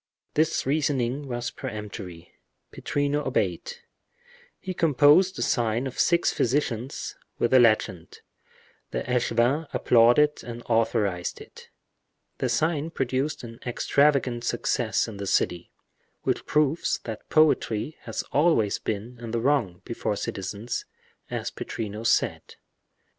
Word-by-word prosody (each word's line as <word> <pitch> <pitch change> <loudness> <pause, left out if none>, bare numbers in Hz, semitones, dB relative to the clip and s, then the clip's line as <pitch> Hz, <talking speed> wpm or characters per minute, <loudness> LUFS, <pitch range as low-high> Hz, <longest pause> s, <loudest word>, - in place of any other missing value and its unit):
This 155 +2 +1
reasoning 140 -2 0
was 120 -1 -3
peremptory—Pittrino 105 - -5
obeyed. 485 - -1 0.9
He 185 - -5
composed 165 +4 +4
the - - -2
sign 115 +1 +1
of 130 - -6
six 170 0 +3
physicians, 125 -1 -1 0.2
with 120 - +1
the 130 - +7
legend; 110 -7 +1 0.7
the - - -3
echevin 125 +4 +1
applauded 120 +6 +4
and 120 0 -7
authorized 110 -6 0
it. - - -14 0.7
The 130 - 0
sign 155 +5 0
produced 135 -1 -2
an 115 0 -9
extravagant 130 -1 +2
success 120 -1 0
in 110 -3 -8
the 100 0 -5
city, 90 -2 0 0.5
which - - -1
proves 150 +1 +1
that 110 -2 -7
poetry 155 -3 +2
has 115 - -3
always 145 -9 +3
been 110 +4 -4
in 120 -1 -7
the 115 +1 -1
wrong, 115 -9 0
before 115 -2 -2
citizens, 100 +4 -4 0.5
as - - -3
Pittrino 105 0 -5
said. - - 0
120 Hz, 115 wpm, -26 LUFS, 110-145 Hz, 0.9 s, the